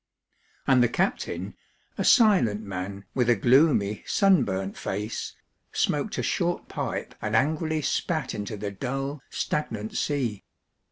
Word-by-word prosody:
And 130 -2 +5
the 120 - +4
captain, 190 +10 -1 0.4
a - - -2
silent 185 - +5
man 100 0 -5
with 125 -2 +1
a 120 - +6
gloomy, 120 -3 +3
sunburnt 100 - +2
face, 105 +3 -4 0.4
smoked - - 0
a - - -1
short - - -1
pipe - - -4
and 110 0 -1
angrily 155 +3 +1
spat 160 +2 -1
into 105 +1 -4
the 100 0 -4
dull, 135 +6 -4
stagnant 110 -7 -3
sea. 125 -8 -1
120 Hz, 125 wpm, -26 LUFS, 105-150 Hz, 0.4 s, a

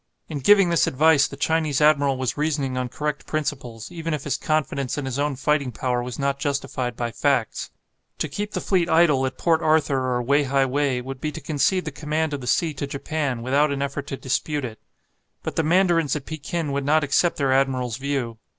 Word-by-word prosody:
In 150 -3 -3
giving 195 +5 +5
this 170 - +3
advice 150 +1 +4
the 140 - -10
Chinese 155 -2 +1
admiral 145 -3 +4
was 130 -1 -2
reasoning 145 -3 -1
on 125 -1 -2
correct 150 +3 -4
principles, 135 -6 -4
even 165 -2 -3
if 145 - -7
his 145 - -1
confidence 145 -4 -1
in 145 - -3
his 130 +1 -3
own 145 -1 0
fighting 140 -1 0
power 125 +1 -1
was 125 0 -6
not 140 0 -1
justified 135 -4 -2
by 120 0 -3
facts. - - 0 0.5
To - - -1
keep 205 +8 -5
the - - -2
fleet 180 -3 +1
idle 160 -5 +4
at 130 - -7
Port 165 -2 +2
Arthur 145 -5 +2
or 125 - -1
Wei 140 +4 +3
hai 135 0 +2
wei 135 -1 0
would 130 +1 -7
be 155 - -2
to - - -6
concede 160 +5 0
the 150 - -3
command 155 +1 -2
of 140 - -3
the 125 - -7
sea 160 +5 +1
to 140 0 -4
Japan, 140 -3 -3
without 140 +4 +2
an 140 0 -1
effort 140 0 -4
to 135 - -4
dispute 145 +2 -1
it. 110 -3 -8 0.6
But - - -4
the - - +2
mandarins 165 -2 +2
at 145 - -5
Pekin 155 0 -4
would 140 0 -1
not 155 +2 +3
accept 155 +4 +2
their 135 -2 +2
admiral's 130 -3 +1
view. 135 -5 -3
140 Hz, 215 wpm, -23 LUFS, 130-155 Hz, 0.6 s, giving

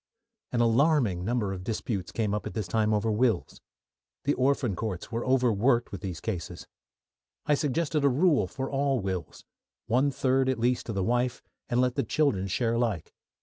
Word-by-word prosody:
An 120 - +1
alarming 120 - +3
number 105 -2 -1
of 90 -1 -7
disputes 105 -3 -3
came 105 -3 -1
up 105 -2 -2
at - - -8
this 105 -5 -2
time 110 +3 +1
over 110 +1 +1
wills. 115 +2 0 0.6
The 145 - +2
Orphan 130 -5 +1
Courts 100 -5 -4
were 115 0 -2
over 130 -3 +3
worked 120 +3 +2
with 100 -3 -6
these 90 -4 -5
cases. 90 -3 -5 0.8
I 150 - +3
suggested 150 +1 0
a 140 - +5
rule 150 +4 +3
for 135 -1 -4
all 135 -1 0
wills: 95 -5 -5 0.4
one 130 +5 +2
third 130 -1 +1
at 130 - 0
least 125 +2 0
to 115 - -3
the 95 -2 -1
wife, 120 +3 0 0.3
and 120 - +1
let 125 -1 +2
the - - 0
children 110 -7 +1
share 115 +4 0
alike. 115 -8 -1
120 Hz, 185 wpm, -28 LUFS, 105-130 Hz, 0.8 s, a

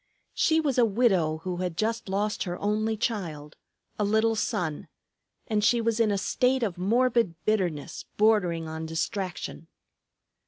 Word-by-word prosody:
She 320 0 +3
was 280 -5 +1
a - - +6
widow 195 -9 +2
who 180 -1 -3
had 180 -2 -3
just 225 -1 -1
lost 205 +2 -1
her 175 -1 -4
only 215 +2 0
child, 170 -10 -3 0.4
a - - +2
little 220 +2 +2
son, 160 -7 -2 0.6
and 215 -2 0
she 235 +2 +4
was 230 0 0
in 225 -2 +3
a 200 - +1
state 250 +5 +1
of 200 -6 -1
morbid 230 0 +2
bitterness 180 -9 -1
bordering 185 -7 +2
on 160 0 -5
distraction. 175 0 -4
210 Hz, 150 wpm, -27 LUFS, 175-225 Hz, 0.6 s, a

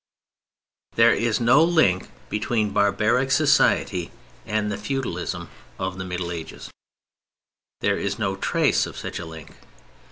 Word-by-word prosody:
There 115 +1 +6
is 110 0 0
no 120 +6 +5
link 160 - +2 0.2
between 105 0 -1
barbaric 105 +6 +2
society 130 - +2 0.4
and 105 -1 -1
the 100 - -3
feudalism 90 -10 -4 0.3
of 95 0 -4
the 95 - -4
Middle 90 -1 -4
Ages; 85 -2 -8 1.1
there - - +1
is - - -2
no 100 -4 -1
trace 95 - +1
of - - -10
such - - -5
a 85 - -7
link. 80 -1 -11
105 Hz, 130 wpm, -23 LUFS, 90-115 Hz, 1.1 s, There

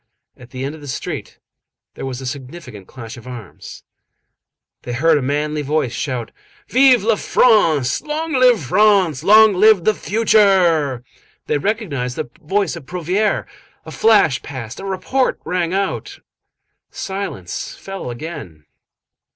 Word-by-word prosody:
At 125 0 -15
the 130 0 -6
end 140 - -4
of 155 - -12
the 145 - -10
street 130 - -6 0.6
there - - -6
was 130 -1 -5
a - - -7
significant 130 - -8
clash 115 -3 -10
of 120 +1 -13
arms. 120 -6 -10 1.0
They 120 - -6
heard 160 +6 +3
a 145 - +1
manly 150 +3 -1
voice 145 -4 -1
shout:— 125 -4 -4 0.4
"Vive 255 -3 +5
la 225 +1 +3
France! 165 - +2
Long 310 +1 -4
live 250 - +4
France! 190 -2 +3
Long 215 +2 +7
live 205 -1 +5
the 215 - +3
future!" 190 - +2 0.4
They 150 - 0
recognized 145 - -2
the 120 - -5
voice 195 +4 -1
of 155 -5 -11
Prouvaire. 180 +4 -1 0.4
A - - -9
flash 205 - +3
passed, 125 -4 -8
a 195 - -7
report 225 +7 -1
rang 175 0 -1
out. 195 +1 -3 0.7
Silence 190 - -5
fell 195 -8 -7
again. 120 - -8
160 Hz, 140 wpm, -19 LUFS, 130-205 Hz, 1.0 s, Long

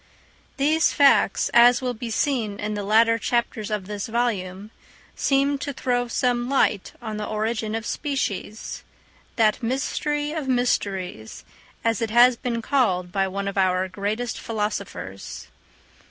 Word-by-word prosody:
These 310 +4 +3
facts, 280 -1 +4
as 240 +1 +7
will 250 -1 -2
be 235 0 -6
seen 225 -4 -1
in 210 +1 -2
the 205 - -3
latter 225 +3 +4
chapters 230 -2 -1
of 210 -3 -2
this 205 0 -5
volume, 210 -4 -2 0.4
seemed 275 0 +1
to 285 - -3
throw 245 -1 0
some 240 +1 0
light 215 -7 +1
on 220 -2 -4
the 210 - -4
origin 220 0 -2
of 225 0 -4
species—that 220 - -3
mystery 290 +4 -1
of 310 -4 -4
mysteries, 195 - -1 0.4
as 230 +1 +1
it 225 - 0
has 240 +2 +6
been 235 -1 -3
called 185 -11 +1
by 195 0 +1
one 200 +1 -4
of 200 0 -2
our 185 0 +2
greatest 210 +5 -3
philosophers. 100 - -5
225 Hz, 140 wpm, -24 LUFS, 200-245 Hz, 0.4 s, as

